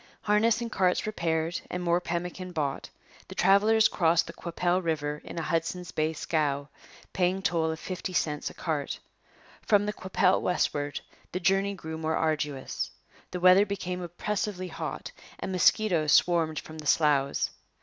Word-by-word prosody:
Harness 215 Hz, +3 st, +3 dB
and 235 Hz, -1 st, -4 dB
carts 185 Hz, -3 st, +2 dB
repaired 165 Hz, -5 st, -1 dB
and 180 Hz, 0 st, -3 dB
more 175 Hz, 0 st, +2 dB
pemmican 180 Hz, +1 st, -4 dB
bought, 145 Hz, -4 st, -2 dB, 0.4 s
the -, -, -9 dB
travellers 215 Hz, +3 st, +5 dB
crossed 170 Hz, -1 st, +2 dB
the -, -, -9 dB
Qu'Appelle 175 Hz, +1 st, -1 dB
river 150 Hz, -2 st, -2 dB
in -, -, -9 dB
a 165 Hz, -, -1 dB
Hudson's 165 Hz, +2 st, -2 dB
Bay 155 Hz, +1 st, 0 dB
scow, 150 Hz, -3 st, -1 dB, 0.4 s
paying 185 Hz, +1 st, +1 dB
toll 165 Hz, -3 st, +1 dB
of 160 Hz, 0 st, -3 dB
fifty 185 Hz, +2 st, -5 dB
cents 150 Hz, -4 st, -1 dB
a -, -, -13 dB
cart. 155 Hz, -4 st, -2 dB, 0.6 s
From 205 Hz, -1 st, +3 dB
the 210 Hz, -, -2 dB
Qu'Appelle 185 Hz, -1 st, +2 dB
westward 145 Hz, -5 st, -1 dB, 0.3 s
the 180 Hz, -, -2 dB
journey 195 Hz, +2 st, +2 dB
grew 160 Hz, -3 st, -6 dB
more 160 Hz, 0 st, 0 dB
arduous. 150 Hz, -4 st, -1 dB, 0.4 s
The 180 Hz, -, -4 dB
weather 185 Hz, +2 st, +7 dB
became 180 Hz, -2 st, -3 dB
oppressively 185 Hz, +1 st, -3 dB
hot -, -, -5 dB, 0.3 s
and -, -, -4 dB
mosquitoes 180 Hz, -4 st, +3 dB
swarmed 165 Hz, -3 st, +3 dB
from 155 Hz, +1 st, -7 dB
the 150 Hz, -, -6 dB
sloughs. 140 Hz, -3 st, +2 dB
175 Hz, 155 wpm, -28 LUFS, 160-185 Hz, 0.6 s, weather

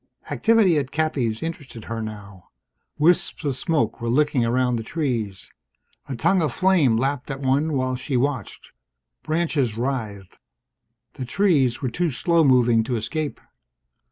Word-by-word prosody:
Activity 220 Hz, -8 st, +3 dB
at 135 Hz, -2 st, -4 dB
Cappy's 140 Hz, -8 st, -1 dB
interested 145 Hz, -8 st, -7 dB
her 115 Hz, 0 st, -5 dB
now. 100 Hz, -4 st, -9 dB, 0.5 s
Wisps 165 Hz, 0 st, +2 dB
of 140 Hz, -3 st, 0 dB
smoke 150 Hz, -2 st, -1 dB
were 115 Hz, -, -2 dB
licking 140 Hz, 0 st, +2 dB
around 125 Hz, +1 st, +1 dB
the -, -, -3 dB
trees. 115 Hz, -, -3 dB, 0.6 s
A 135 Hz, -, -3 dB
tongue 190 Hz, +9 st, +2 dB
of 155 Hz, -4 st, 0 dB
flame 170 Hz, -9 st, +3 dB
lapped 135 Hz, +3 st, -2 dB
at 135 Hz, -1 st, -4 dB
one 140 Hz, +4 st, +1 dB
while 130 Hz, -1 st, 0 dB
she 130 Hz, +1 st, -2 dB
watched. 130 Hz, -4 st, -3 dB, 0.5 s
Branches 155 Hz, -8 st, -1 dB
writhed. 110 Hz, -7 st, -4 dB, 0.7 s
The 130 Hz, -, -6 dB
trees 140 Hz, -6 st, +1 dB
were 130 Hz, -, -1 dB
too 175 Hz, +4 st, 0 dB
slow 165 Hz, +4 st, +2 dB
moving 120 Hz, -4 st, +4 dB
to 125 Hz, -, -2 dB
escape 145 Hz, +5 st, -3 dB
130 Hz, 145 wpm, -23 LUFS, 115-155 Hz, 0.7 s, moving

